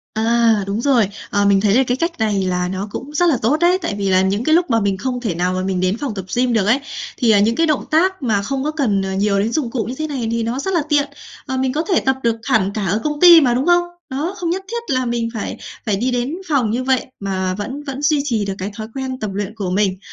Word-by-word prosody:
À, 225 -1 +2
đúng 200 +3 -2
rồi. 245 -6 +3 0.2
Ờ, 205 0 +1
mình 200 -1 +4
thấy 205 -1 +3
là 265 - +5
cái 250 - 0
cách 335 +1 -2
này 210 -3 +1
là 180 -1 0
nó 190 +2 -4
cũng 280 +7 -7
rất 350 +3 +3
là 285 - +2
tốt 255 +7 +2
đấy. 350 +1 +4
Tại 270 -12 -2
vì 200 -1 -1
là 185 0 +4
những 195 +4 0
cái 315 +4 +3
lúc 350 0 +2
mà 230 -2 +3
mình 200 -2 0
không 250 +5 -3
thể 215 -8 -2
nào 180 +2 0
mà 185 - -1
mình 190 -1 -1
đến 185 +3 +1
phòng 260 -2 -3
tập 190 -2 -5
gym 245 0 +2
được 215 -4 +2
ấy, 240 +6 +3 0.4
thì, 235 -2 +3
à, 205 - +5
những 220 +3 +2
cái 330 +1 +2
động 305 -2 0
tác 365 +1 +2
mà 215 -5 +1
không 270 +6 -3
có 305 - -1
cần, 245 -11 0
ờ, 190 0 -3
nhiều 200 +1 +1
đến 215 +3 0
dụng 255 -4 -1
cụ 235 -3 -1
như 245 - -5
thế 310 - -2
này 265 -6 -3
thì 230 0 -1
nó 235 +3 -2
rất 385 +7 -2
là 340 - +2
tiện, 290 -1 +2 0.4
ờ, 260 - -3
mình 260 0 0
có 310 +3 0
thể 365 - +4
tập 265 0 +1
được 230 -1 +2
hẳn 200 -3 +1
cả 210 -2 -2
ở 210 +4 0
công 295 -1 -2
ty 345 -2 +9
mà, 250 -4 +3
đúng 255 +3 0
không? 350 0 +4 0.3
Đó, 290 +8 -3
không 345 -4 -2
nhất 375 +3 -2
thiết 470 -8 -3
là 255 0 0
mình 235 -1 -1
phải 220 - -4 0.3
phải 210 -3 +1
đi 245 +6 -1
đến 245 +5 -1
phòng 255 -8 +2
như 245 +3 -1
vậy, 260 -1 +1
mà 190 -2 -2
vẫn 260 +9 -5
vẫn 275 -1 -6
duy 295 0 +2
trì 230 -7 -1
được 195 - -2
cái 195 +2 -4
thói 215 0 -6
quen 260 -1 -4
tập 215 - -3
luyện 205 +1 -3
của 200 -4 -3
mình. 190 0 +1
235 Hz, 295 wpm, -19 LUFS, 200-285 Hz, 0.4 s, ty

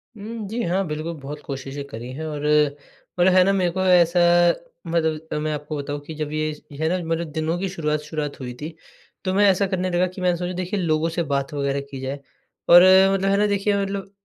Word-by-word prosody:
उम, 215 0 -7
जी, 235 +4 -3
हाँ। 185 +3 0
बिल्कुल, 155 +2 -4
बहुत 150 +2 -7
कोशिशें 135 +1 -6
करी 120 0 -8
हैं 160 +3 -6
और 150 -1 -4 0.7
मतलब 185 +1 +5
है 185 -1 +6
ना, 195 - +3
मेरे 180 -3 +1
को 185 +1 -2
ऐसा 175 -1 +4 0.7
मतलब 160 -1 -1
मैं 155 0 -1
आपको 150 +1 -5
बताऊँ 145 +1 -4
कि 160 - -7
जब 150 -1 -4
ये 155 0 -1 0.2
ये 140 - -10
है 160 - +2
ना, 185 - +1
मतलब 165 -1 -2
दिनों 160 +2 -1
की 195 -1 -2
शुरुआत 150 -4 -1
शुरुआत 150 -2 -5
हुई 125 -1 -6
थी। 160 +1 -6 0.5
तो 185 - 0
मैं 205 +1 +4
ऐसा 195 +1 +2
करने 185 -1 -1
लगा 180 +1 +1
कि 185 +1 -9
मैंने 180 -1 +2
सोचा, 180 +1 -3
देखिए, 185 +3 -3
लोगों 160 -1 +1
से 170 +1 -1
बात 140 -1 -2
वग़ैरह 140 -1 -1
की 135 - -6
जाए 135 +2 -4 0.5
और 175 +1 +10 0.3
मतलब 195 0 +1
है 200 - +3
ना, 210 0 +3
देखिए, 205 0 +1
मतलब 195 0 -4
165 Hz, 225 wpm, -23 LUFS, 150-185 Hz, 0.7 s, और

